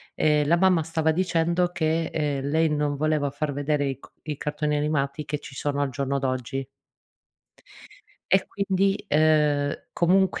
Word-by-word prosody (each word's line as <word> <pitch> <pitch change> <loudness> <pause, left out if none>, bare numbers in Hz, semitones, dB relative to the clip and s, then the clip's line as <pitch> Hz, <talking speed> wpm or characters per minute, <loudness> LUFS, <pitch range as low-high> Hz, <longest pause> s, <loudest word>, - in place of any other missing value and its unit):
ehm, 150 -1 +2
la 170 - +5
mamma 180 -2 +3
stava 160 0 0
dicendo 175 0 +1
che, 160 -1 0
ehm, 145 -3 -2
lei 160 +2 +2
non 150 -1 0
voleva 150 -1 0
far 145 +1 -2
vedere 145 +1 0
i 135 -1 -4
co - - -16 0.3
cartoni 150 0 -1
animati 145 -1 -1
che 150 +1 -3
ci 140 - -11
sono 145 0 -1
al 140 - 0
giorno 140 +2 -2
d'oggi 130 0 -2 1.7
e 190 0 +4
quindi, 195 0 0
ehm, 150 -2 +2
comunque 185 +2 +2
150 Hz, 150 wpm, -25 LUFS, 145-165 Hz, 1.7 s, la